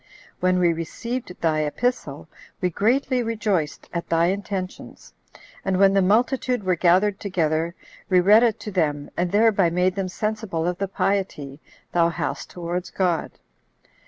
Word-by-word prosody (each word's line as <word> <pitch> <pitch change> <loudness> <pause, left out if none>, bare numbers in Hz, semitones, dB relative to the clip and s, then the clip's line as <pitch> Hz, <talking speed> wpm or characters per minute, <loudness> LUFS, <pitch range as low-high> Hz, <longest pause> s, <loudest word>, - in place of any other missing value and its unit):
When 185 0 +2
we 175 -2 +3
received 180 +6 -5
thy 155 -2 +2
epistle, 155 - -2 0.3
we 180 -1 0
greatly 250 - +1
rejoiced 215 -9 -2
at 170 -1 -4
thy 165 +1 +3
intentions; 195 -2 -6 0.5
and 190 -1 0
when 195 0 +5
the 195 - +4
multitude 245 +4 +1
were 185 -1 +1
gathered 185 +4 +3
together, 165 -3 -1 0.3
we 185 -1 +5
read 205 +5 +6
it 235 -3 +2
to 210 - -6
them, 150 -6 -1
and 175 0 -1
thereby 205 -4 +4
made 180 +2 +1
them 190 -1 -3
sensible 215 -4 -3
of 180 0 -2
the 195 - -1
piety 185 -8 -2 0.3
thou 170 -1 +3
hast 170 - -4
towards 175 +1 -4
God. 180 -4 -1
185 Hz, 150 wpm, -23 LUFS, 170-210 Hz, 0.5 s, read